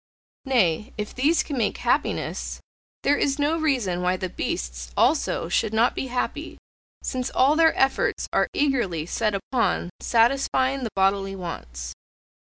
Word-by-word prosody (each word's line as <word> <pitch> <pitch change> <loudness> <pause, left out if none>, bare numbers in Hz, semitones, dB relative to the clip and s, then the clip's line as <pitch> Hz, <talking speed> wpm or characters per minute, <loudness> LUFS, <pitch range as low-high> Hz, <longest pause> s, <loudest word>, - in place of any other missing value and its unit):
Nay, 220 -4 +1
if 210 0 -4
these 295 +6 +2
can 280 -4 -4
make 215 - 0
happiness, - - -1 0.4
there 290 - +3
is 275 0 +1
no 300 +3 +1
reason 245 - 0
why 180 +1 +1
the 185 0 -3
beasts - - -4
also - - +2
should 220 +5 0
not 230 +2 +3
be 265 - -3
happy, 250 0 -3 0.5
since 255 0 -2
all 275 +4 +3
their 325 0 +4
efforts 270 0 +1
are - - +3
eagerly 235 - 0
set 210 +3 -1
upon 195 -3 -1
satisfying 260 +2 +2
the 230 - -2
bodily 195 0 +1
wants. 65 - -6
230 Hz, 145 wpm, -24 LUFS, 185-270 Hz, 0.5 s, their